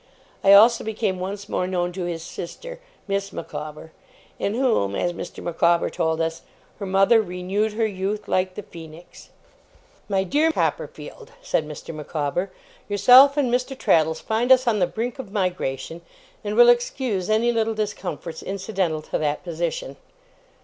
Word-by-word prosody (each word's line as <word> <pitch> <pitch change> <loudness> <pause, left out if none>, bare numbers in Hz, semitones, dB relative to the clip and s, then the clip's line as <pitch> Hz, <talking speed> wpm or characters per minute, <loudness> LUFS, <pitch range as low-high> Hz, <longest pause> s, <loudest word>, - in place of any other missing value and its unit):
I 195 - +7
also 225 +4 +7
became 215 -3 -2
once 200 +2 -5
more 180 - -1
known 180 -1 -1
to 180 0 -4
his 165 -2 -4
sister, - - -8 0.3
Miss 200 0 -2
Micawber, 150 +1 -7 0.5
in 200 - -1
whom, 230 - +1
as 175 - -1
Mr. - - -8
Micawber 170 0 +2
told 160 0 -1
us, 165 0 -2 0.4
'her 200 - -4
mother 195 +4 +4
renewed 195 +3 -2
her 225 +1 0
youth, 205 +1 -3
like 185 0 0
the 210 - -6
Phoenix'. 165 0 -13 0.8
'My 195 -1 +1
dear 300 - +2
Copperfield,' 470 +7 -4
said 160 - 0
Mr. 150 +2 -8
Micawber, 155 +3 -3 0.4
'yourself 250 +8 +7
and 255 -4 +1
Mr. 255 +2 -1
Traddles 160 -5 +2
find 230 +3 0
us 260 0 +6
on 225 -3 +2
the 180 - +3
brink 235 +7 -4
of 230 -7 -7
migration, 170 - -3 0.4
and 210 0 -3
will 240 +1 +8
excuse 240 -5 +1
any 225 +2 +3
little 225 -1 0
discomforts 200 -6 -4
incidental 190 -5 -2
to - - -3
that 150 -1 -1
position. 165 -5 -4
195 Hz, 155 wpm, -23 LUFS, 170-225 Hz, 0.8 s, will